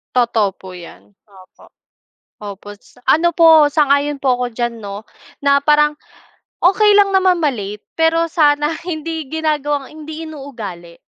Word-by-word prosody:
Totoo 225 -5 +1
po 190 - -12
yan, 135 - -13 0.2
opo. 190 -2 -19 0.7
Opo, 205 -1 -10
sa 205 - -23
ano 340 +2 +3
po, 320 -2 +6
sang-ayon 290 -1 +1
po 255 -3 +1
ako 250 - -2
diyan, 240 0 -3
'no? 205 -1 -8 0.4
Na 280 0 +3
parang, 300 +1 +2 0.7
okey 415 +3 +4
lang 405 -1 +4
naman 370 -3 +2
ma-late, 210 -7 -3 0.2
pero 330 +1 +2
sana, 295 -1 +2 0.2
hindi 320 -2 -5
ginagawang 295 -2 -2
hindi 310 +1 -9
inuugali. 225 - -9
290 Hz, 135 wpm, -17 LUFS, 220-320 Hz, 0.7 s, po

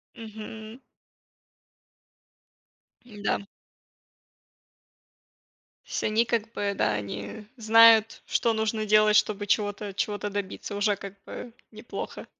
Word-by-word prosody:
Мгм. 220 +1 -9 2.2
М-да. 205 -3 -3 2.4
Сь - - -3
они 220 +2 +2
как 225 -1 -1
бы, 200 -1 -1
да, 110 - +1
они 100 - -6
знают, 225 0 +6
что 230 -1 +1
нужно 220 0 -1
делать, 215 0 +5
чтобы 205 -1 +2
чего-то 205 -1 -1
чего-то 205 -1 -2
добиться. 205 +1 -5
Уже, 205 0 +1
как 200 0 -9
бы, 240 -2 -8 0.2
неплохо. 215 +2 -7
215 Hz, 95 wpm, -27 LUFS, 205-225 Hz, 2.4 s, знают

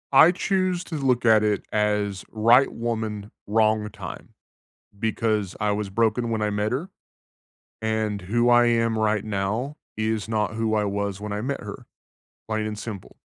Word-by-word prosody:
I 155 +6 +8
choose 185 -1 0
to 165 - -6
look 130 -4 +1
at 110 -1 +6
it 105 -1 +1
as: 105 -2 0
right 115 +5 +5
woman, 110 -3 -3 0.2
wrong 110 0 +2
time, 100 -5 -8 0.7
because 110 -3 -1
I 105 0 +1
was 105 -1 -2
broken 115 +3 +1
when 110 -1 -1
I 105 - +1
met 105 +2 -1
her, 160 +10 -3 0.9
and 110 -2 -1
who 120 +6 +1
I 120 0 +6
am 115 -1 +2
right 110 -1 +1
now, 110 +7 -2 0.2
is 110 -1 -1
not 110 -1 0
who 110 0 0
I 105 -1 +2
was 100 -1 -2
when 105 0 -5
I 105 - -2
met 135 +5 -3
her. 105 -1 -9 0.6
Plain 110 -1 -1
and 105 -1 -4
simple. 105 -3 -8
110 Hz, 165 wpm, -24 LUFS, 105-115 Hz, 0.9 s, I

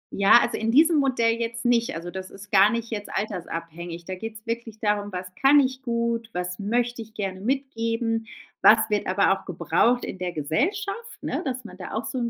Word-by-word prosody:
Ja, 200 +4 +7
also - - -1
in 225 - -1
diesem 315 +5 +5
Modell 235 -4 +2
jetzt 230 0 -4
nicht. 235 -4 +2
Also 170 +1 -6
das 190 0 -6
ist 200 +1 -13
gar 195 +1 +6
nicht 230 +1 -3
jetzt 205 -2 -4
altersabhängig. 170 -4 -5
Da 185 - -5
geht's 220 +2 -7
wirklich 230 -1 -5
darum 210 -1 0
„was 180 0 -4 0.2
kann 285 +2 +7
ich 260 -1 0
gut, 235 -2 -1
was 180 +2 -4
möchte 240 +3 -1
ich 220 0 -12
gerne 195 -2 -4
mitgeben, 230 -3 -1 0.3
was 220 - +8
wird 205 - 0
aber 195 +1 +3
auch 195 0 -7
gebraucht 235 +7 +1
in 190 - -7
der 180 -1 -2
Gesellschaft,“ 390 - -2
ne, - - -2
dass 255 -4 -4
man - - -10
da - - -8
auch 220 +1 -2
so 240 +4 -3
'n 235 -1 -1
225 Hz, 205 wpm, -25 LUFS, 195-240 Hz, 0.3 s, was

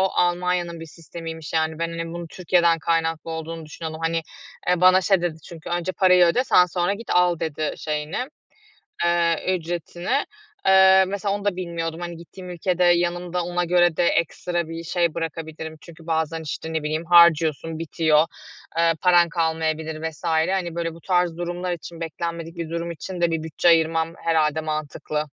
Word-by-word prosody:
Almanya'nın 175 -1 0
bir 165 - -7
sistemiymiş, 165 -1 -9
yani. 160 0 0
Ben, 170 0 -1
hani, 165 0 -4
bunun 170 0 -6
Türkiye'den 170 -1 +2
kaynaklı 165 0 -1
olduğunu 160 0 -6
düşünüyordum. 160 +1 -7
Hani, 165 0 0 0.5
eee, 180 0 +2
bana 185 +1 +6
şey 190 -1 +2
dedi 170 -2 -2
çünkü, 165 -2 -9
"Önce 175 +1 -1
parayı 180 -1 +5
öde, 210 +10 +2
sen 180 - +5
sonra 180 +2 0
git, 225 +1 -9
al." 180 -2 +3
dedi, 155 -1 -2
şeyini, 150 +2 -3 0.9
eee, 170 +1 +2
ücretini. 175 - -2 0.4
Eee, 190 0 +7
mesela 200 +1 -2
onu 205 0 -6
da 200 -3 +1
bilmiyordum. 170 -2 -4
Hani, 175 -1 -6
gittiğim 180 +2 -11
ülkede 180 +1 0
yanımda 175 0 +1
ona 175 0 -1
göre 175 -1 +3
de - - +3
ekstra 170 0 -1
bir 165 +1 -6
şey 170 -1 0
bırakabilirim. 160 -1 -5
Çünkü 165 -1 -14
bazen, 160 0 -1
işte, 160 +1 -5
ne 160 -1 -1
bileyim, 155 +2 -2
harcıyorsun, 165 -2 +4
bitiyor, 160 -1 +2 0.5
eee, 165 0 +4
paran 175 -2 +5
kalmayabilir 160 -1 -1
vs. 155 +1 -17
Hani, 170 +1 0
böyle, 165 -1 -2
bu 165 - -14
tarz 180 -2 +1
durumlar 175 +1 -3
için, 170 0 -9
beklenmedik 165 +1 -5
bir 165 -2 -4
durum 170 +1 -3
için 175 +2 -7
de 170 -1 +3
bir 160 -1 -2
bütçe 160 +2 -1
ayırmam 165 0 +3
herhâlde 160 -1 +2
mantıklı. 155 0 -3
170 Hz, 170 wpm, -23 LUFS, 160-175 Hz, 0.9 s, Eee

